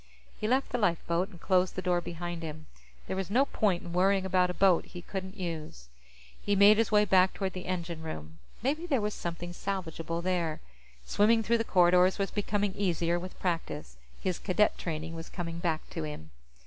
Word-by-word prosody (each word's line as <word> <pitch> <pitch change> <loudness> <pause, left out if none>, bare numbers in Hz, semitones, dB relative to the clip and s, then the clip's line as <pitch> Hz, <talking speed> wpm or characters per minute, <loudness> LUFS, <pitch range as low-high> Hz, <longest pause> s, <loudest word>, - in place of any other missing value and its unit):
He 215 - -3
left 260 +4 +1
the 245 - 0
lifeboat 175 -1 +1
and 175 -5 -14
closed 185 0 +2
the 185 - -2
door 180 -1 +2
behind 175 0 -5
him. 155 -1 -7 0.4
There - - -3
was 190 -1 -3
no 255 +7 +4
point 200 -9 0
in 170 - -7
worrying 190 +2 +3
about 180 -1 +3
a - - -2
boat 185 -1 +4
he 175 - -10
couldn't 190 +1 -6
use. 160 - -6 0.5
He 205 - +1
made 205 +2 +7
his 225 - +2
way 210 0 +5
back 190 -1 +4
toward 190 -2 -2
the 185 - -7
engine 170 -3 -3
room. 80 - -7 0.2
Maybe 305 +7 0
there 275 -7 +2
was 210 0 -1
something 175 0 -5
salvageable 170 -3 -4
there. 175 -4 0 0.5
Swimming 225 - +3
through 235 +1 +2
the - - +1
corridors 180 -2 +4
was 195 -1 -1
becoming 205 -1 0
easier 175 -3 0
with 185 +1 -9
practice; 165 - -3 0.2
his 185 -2 -2
Cadet 210 +2 +2
training 160 -1 -4
was 165 0 -7
coming 170 -2 -5
back 165 -2 -1
to 165 - -4
him. 150 - -7
180 Hz, 195 wpm, -30 LUFS, 170-200 Hz, 0.5 s, made